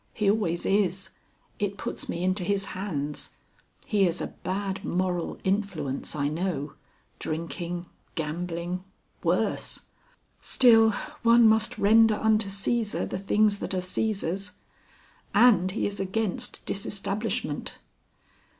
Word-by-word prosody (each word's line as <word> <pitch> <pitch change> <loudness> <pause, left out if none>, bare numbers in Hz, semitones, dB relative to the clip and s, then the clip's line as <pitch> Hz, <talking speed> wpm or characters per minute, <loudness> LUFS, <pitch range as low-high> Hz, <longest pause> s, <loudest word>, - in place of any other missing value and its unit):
He 205 -2 +3
always 180 -6 0
is. 195 -1 +1 0.5
It 200 -1 -1
puts - - -3
me 170 - -2
into 185 +1 +1
his 195 +1 0
hands. 150 -7 -4 0.5
He 205 -7 +3
is 170 +1 -1
a - - -4
bad 195 0 -2
moral 180 -1 -1
influence, 190 -10 -1
I 145 -1 0
know. 155 -3 -2 0.5
Drinking. 170 +2 -4 0.3
Gambling. 170 +3 -3 0.4
Worse. - - +1 0.6
Still, 225 -3 +6 0.3
one 235 0 +6
must 220 0 +3
render 220 +1 +5
unto 215 -1 +2
Cæsar 210 +3 -1
the - - -4
things 205 +1 +2
that - - -2
are - - 0
Cæsar's. 195 0 -2 0.8
And 205 -7 +6
he 195 - -1
is 200 -1 -3
against 195 +1 -2
Disestablishment...." 200 +2 -2
195 Hz, 115 wpm, -27 LUFS, 175-210 Hz, 0.8 s, Still